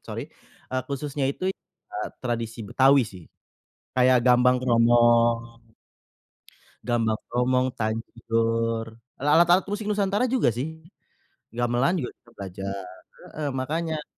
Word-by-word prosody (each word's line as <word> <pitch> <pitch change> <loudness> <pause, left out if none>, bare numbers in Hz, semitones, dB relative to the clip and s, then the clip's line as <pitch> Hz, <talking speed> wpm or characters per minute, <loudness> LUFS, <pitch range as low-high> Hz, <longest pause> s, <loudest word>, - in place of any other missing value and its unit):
sorry, - - -5 0.5
eee, 130 0 0
khususnya 140 0 -3
itu, 185 +7 -2 0.4
ah, 365 -2 -3
tradisi 115 -1 -3
Betawi 135 +5 +4
sih. 90 -5 -11 0.7
Kayak 125 -1 +4
Gambang 125 0 +5
Kromong, 115 -1 +3 1.2
Gambang 115 -3 +1
Kromong, 125 +1 +1
Tanjur, 115 0 -1 0.3
lalat 155 +5 +4
alat 180 +2 +5
musik 205 +1 -3
nusantara 205 +2 +1
juga 250 - +2
sih, 160 +6 -5 0.7
gamelan 120 +8 +1
kita 125 - -4
juga 120 - -24
belajar. 100 0 -5 0.5
Heeh, 150 -2 -2
makanya 155 +4 -3
125 Hz, 110 wpm, -25 LUFS, 115-150 Hz, 1.2 s, Gambang